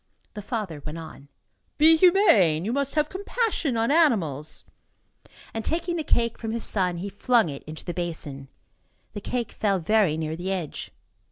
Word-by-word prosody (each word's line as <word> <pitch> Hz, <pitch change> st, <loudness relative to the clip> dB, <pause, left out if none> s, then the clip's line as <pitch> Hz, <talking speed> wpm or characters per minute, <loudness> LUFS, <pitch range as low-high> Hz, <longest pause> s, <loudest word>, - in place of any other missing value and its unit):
The 210 Hz, -, -6 dB
father 205 Hz, -, -4 dB
went 155 Hz, +1 st, -6 dB
on: 160 Hz, -3 st, -10 dB, 0.5 s
"Be 315 Hz, +2 st, +7 dB
humane. 275 Hz, -, +5 dB
You 225 Hz, -, -1 dB
must 280 Hz, +1 st, -1 dB
have 300 Hz, -1 st, +2 dB
compassion 385 Hz, -, -1 dB
on 230 Hz, +3 st, +1 dB
animals." 190 Hz, -, +1 dB, 0.9 s
And, 225 Hz, -, -3 dB
taking 340 Hz, +5 st, -1 dB
the 325 Hz, -, -2 dB
cake 235 Hz, -5 st, 0 dB
from 225 Hz, -1 st, -4 dB
his 230 Hz, -, -2 dB
son, 180 Hz, -4 st, +1 dB
he 185 Hz, +4 st, -4 dB
flung 220 Hz, 0 st, +2 dB
it 140 Hz, -1 st, -7 dB
into 155 Hz, +1 st, -9 dB
the 175 Hz, -, -3 dB
basin. 155 Hz, -6 st, -5 dB, 0.7 s
The 205 Hz, -, -6 dB
cake 240 Hz, +1 st, -3 dB
fell 200 Hz, -2 st, 0 dB
very 185 Hz, -2 st, +2 dB
near 160 Hz, 0 st, -3 dB
the 180 Hz, +3 st, -4 dB
edge. 180 Hz, -6 st, -4 dB
210 Hz, 170 wpm, -25 LUFS, -, 0.9 s, Be